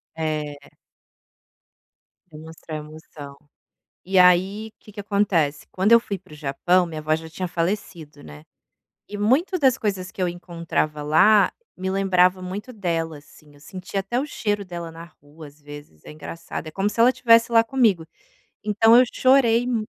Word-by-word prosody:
É. 150 -3 -4 1.6
Demonstrar 160 0 -10
emoção. 150 -2 -12 0.7
E 190 +1 +1
aí 190 +5 +3
que 210 - -16
que 205 - -8
acontece, 195 -8 0
quando 195 +5 +1
eu 235 - +8
fui 200 -4 -5
para 180 -3 -21
o - - -10
Japão 165 +5 +1
minha 160 -2 -7
avó 155 +1 0
já 160 +1 -6
tinha 180 +3 -5
falecido, 170 -3 -4
né, 75 0 -12 0.7
e 205 - -7
muito 265 - +1
das 265 -5 +3
coisas 190 -3 -3
que - - -11
eu 180 - +1
encontrava 170 -3 -3
lá 185 +7 +4 0.2
me 190 +1 -3
lembrava 185 -1 +2
muito 200 +7 -7
dela, 165 -7 -3
assim, 150 0 -20
eu 145 - -20
sentia 185 +5 -6
até 220 +6 -3
o 270 - -1
cheiro 205 -7 -3
dela 170 -2 -7
na 165 +1 -11 0.2
rua 150 +2 -13
às 145 +1 -18
vezes, 145 - -13
é - - -11
engraçado, 155 +2 -8
é 155 - -6
como 195 +4 -1
se 210 - -11
ela 245 +3 +5
tivesse 230 -2 +4
lá 230 -1 +6
comigo, 225 -9 +1 0.6
então 220 +2 +4
eu 250 - +7
chorei 245 -3 +3
mu 235 -3 -1
180 Hz, 170 wpm, -22 LUFS, 155-210 Hz, 1.6 s, eu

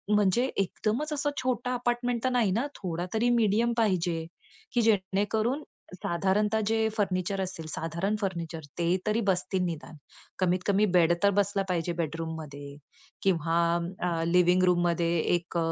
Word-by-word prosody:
म्हणजे 210 +5 +3
एकदमच 225 - -1
असं 290 0 0
छोटं 250 -1 -1
अपार्टमेंट 240 -1 -1
तर 260 - +2
नाही, 230 -6 +2
ना, 235 +9 0
थोडा 175 -2 -3
तरी 235 +2 +2
मीडियम 230 +1 +2
पाहिजे, 175 -6 +1 0.5
की 240 - +3
जेणेकरून 215 +5 +1 0.3
साधारणतः 195 +5 +1
जे 220 0 +2
फर्निचर 195 -1 0
असेल, 180 -4 -5
साधारण 170 +7 -2
फर्निचर 170 -4 -3 0.2
ते 170 +2 +2
तरी 220 +2 +2
बसतील, 185 0 +1
निदान 160 -2 -5 0.4
कमीतकमी 185 +3 +2
बेड 170 -1 +5
तर 200 - +6
बसला 200 0 +1
पाहिजे 175 -1 0
बेडरूममध्ये, 155 -3 -5 0.5
किंवा 165 -3 +1 0.5
अ, 165 -1 -1
लिविंग 180 +1 +4
रूममध्ये 175 -1 +2 0.2
एक 170 0 -4
190 Hz, 135 wpm, -28 LUFS, 170-220 Hz, 0.5 s, तर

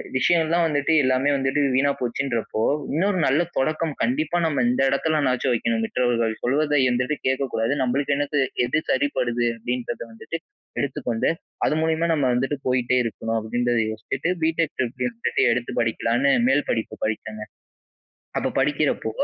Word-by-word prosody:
விஷயோல்லாம் 165 +3 +3
வந்துட்டு 150 +1 +1
எல்லாமே 130 +2 +2
வந்துட்டு 135 +2 0
வீணா 140 +2 +3
போச்சுன்றப்போ, 120 -3 -2 0.3
இன்னொரு 190 +4 +1
நல்ல 140 +5 +3 0.2
தொடக்கம் 155 +3 0
கண்டிப்பா 255 - 0
நம்ம 140 -6 +1
இந்த 125 - +1
இடத்துலனாச்சும் 140 -4 +1
வைக்கணும், 115 -1 0
மற்றவர்கள் 115 -2 0
சொல்வதை 145 +3 +2
இந்தவாட்டி 125 +4 0
கேட்கக்கூடாது. 130 -2 0
நம்மளுக்கு 140 +3 0
என்னது 145 0 0 0.2
எது 155 +5 0
சரிப்படுது? 125 -3 0
அப்பிடின்றத 120 +1 -4
வந்துட்டு 165 +8 -6 0.4
எடுத்துக்கொண்டு 125 -4 -1 0.4
அது - - +1
மூலியமா 160 +1 +1
நம்ம 145 -4 +1
வந்துட்டு 135 +4 0
போயிட்டே 125 0 +2
இருக்கணும். 115 0 -3
அப்பிடின்றத 120 +2 0
யோசிச்சுட்டு, 130 +9 -3
பிடெக் 160 -1 0
ட்ரிபிள்ளி 125 0 -2
இன்னு 115 -1 -21
சொல்லி - - +2
எடுத்து 125 0 -3
படிக்கலான்னு 115 +4 +1 0.2
மேல் 145 +2 +2
படிப்பு 115 - -2
படிச்சேங்க. 110 0 -4 0.9
அப்ப - - -1
படிக்கிறப்போ 140 -4 +1
130 Hz, 135 wpm, -23 LUFS, 120-150 Hz, 0.9 s, விஷயோல்லாம்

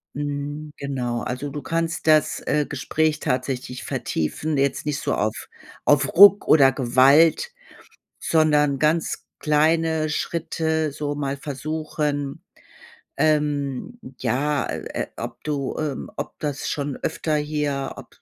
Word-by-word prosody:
Hm, 145 +1 -4
genau. 125 -4 -3
Also, 130 +3 -4
du 145 0 -6
kannst 165 +1 -2
das, 155 -1 +3
äh, 150 -1 +1
Gespräch 150 +2 0
tatsächlich 125 -2 -3
vertiefen. 145 - -2
Jetzt 140 +1 0
nicht 150 -1 -1
so - - -1
auf 110 +1 -2 0.4
auf 140 -2 +4
Ruck 200 +2 +8
oder 135 -4 +6
Gewalt, 135 - +4 0.7
sondern 150 -3 +2
ganz 155 +2 0
kleine 160 +1 +2
Schritte 160 0 -1
so 145 0 -3
mal 140 -1 -3
versuchen, 145 0 -3 0.7
ähm, 150 - 0 0.2
ja, 145 +3 0
äh, - - -5 0.2
äh, - - -8
ob 120 0 -7
du, 140 -3 -2
ähm 150 -4 -4
ob - - -5
das 145 -2 -3
schon 145 -2 -3
öfter 155 -2 -2
hier, 150 -2 -2
ob - - -11
145 Hz, 125 wpm, -23 LUFS, 140-155 Hz, 0.7 s, Ruck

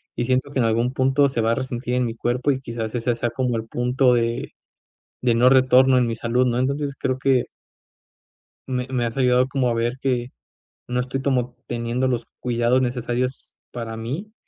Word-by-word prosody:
y 120 - -1
siento 130 +2 0
que 135 - -2
en 115 - +3
algún 115 +3 +1
punto 135 +2 +3
se 125 -3 -1
va 115 +1 +2
a - - 0
resentir 125 -1 -3
en 125 0 +1
mi 115 - -3
cuerpo 120 +4 0
y 130 -1 -2
quizás 115 -3 -5
ese 120 0 0
sea 120 +1 -1
como 125 -1 -1
el 110 0 -5
punto 125 +2 +2
de 115 0 -1 0.7
de 120 -2 +3
no 125 +2 +5
retorno 130 0 +5
en 125 - +2
mi 115 - -2
salud, 120 +3 +1
¿no? 120 0 0
Entonces 140 +2 -1
creo 130 -1 -1
que 130 -2 +2 1.2
me 125 -1 -2
me 125 -2 0
has 115 - -5
ayudado 125 -1 +3
como 130 -2 0
a 115 - 0
ver 120 +3 -1
que 125 -2 -1 0.6
no 125 0 0
estoy 130 +2 -2
como 125 -3 0
teniendo 120 +2 -1
los 120 -2 -1 0.2
cuidados 120 +1 +2
necesarios 125 +1 -3
para 115 -2 -5
mí 150 - -5
125 Hz, 200 wpm, -22 LUFS, 120-130 Hz, 1.2 s, no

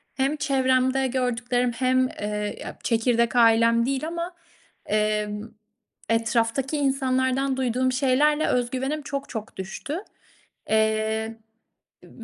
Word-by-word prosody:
hem 270 +2 +1
çevremde 265 -2 +2
gördüklerim 245 -1 0
hem, 255 +1 +2
eee, 210 -3 -4
ya - - -7
çekirdek 235 0 +1
ailem 230 0 +5
değil 275 +3 -1
ama, 340 +2 -4 0.5
emm, 210 0 -1 0.6
etraftaki 230 +5 +1
insanlardan 265 -1 +1
duyduğum 255 0 0
şeylerle 285 +4 +2
öz 245 -1 +1
güvenim 270 +4 -2
çok 280 0 -5
çok 220 -2 -7
düştü. 215 - -5 0.7
Eee, 220 +1 +1 0.7
b - - -16
255 Hz, 110 wpm, -25 LUFS, 225-270 Hz, 0.7 s, ailem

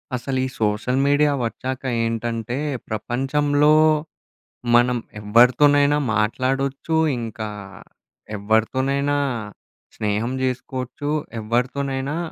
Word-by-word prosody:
అసలు 130 +2 -2
ఈ - - -1
social 110 +5 +1
media 145 +1 +3
వొచ్చాకేంటంటే, 115 -1 -2 0.3
ప్రపంచంలో 145 +7 +1 1.0
మనం 120 +1 +4 0.2
ఎవరితోనైనా 140 +7 +4 0.2
మాట్లాడొచ్చు, 135 +8 0 0.2
ఇంకా 110 -1 -5 0.9
ఎవరితోనైనా 130 +7 +1 0.8
స్నేహం 105 +3 -1
చేసుకోవచ్చు, 130 +2 -3 0.3
ఎవరితోనైనా 135 +5 -1
130 Hz, 70 wpm, -22 LUFS, 115-140 Hz, 1.0 s, మనం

